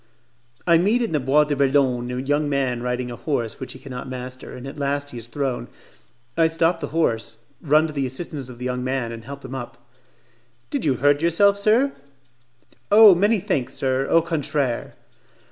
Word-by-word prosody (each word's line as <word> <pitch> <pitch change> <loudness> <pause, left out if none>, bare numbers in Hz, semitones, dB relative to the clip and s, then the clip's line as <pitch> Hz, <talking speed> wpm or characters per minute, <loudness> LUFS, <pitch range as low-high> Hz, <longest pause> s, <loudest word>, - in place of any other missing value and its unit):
I 170 -2 +5
meet 215 +7 +2
in 230 - -2
the 155 - +1
Bois 140 +3 +4
de 150 -1 -1
Boulogne 135 -3 +2
a 125 - -3
young 145 +3 0
man 130 -4 0
riding 125 0 -2
a - - -5
horse 120 -5 -2
which 130 - -7
he - - -10
cannot 130 -1 -8
master, 130 0 -7
and 125 - -9
at 140 +2 -8
last 140 0 -1
he 120 - -7
is 115 - -9
thrown. 130 0 -3 0.7
I 165 -1 +4
stop 165 +1 +1
the - - -4
horse, 115 -7 -1 0.2
run 155 +1 +4
to 155 - -5
the 140 -2 -1
assistance 135 0 -5
of 125 - -10
the 125 - -6
young 125 0 -2
man 130 -2 -2
and 115 -1 -9
help 140 +1 -9
him 130 - -7
up. 130 -2 -6 0.9
"Did - - -2
you 135 -4 +2
hurt 145 +3 +3
yourself, 200 +5 +3
sir?" 230 +7 +3 1.0
"Oh, 210 -1 +9
many 205 +5 +2
thanks, 140 - -2
sir, 135 0 0
au 165 -1 +4
contraire." 145 -6 -2
140 Hz, 195 wpm, -23 LUFS, 125-160 Hz, 1.0 s, Oh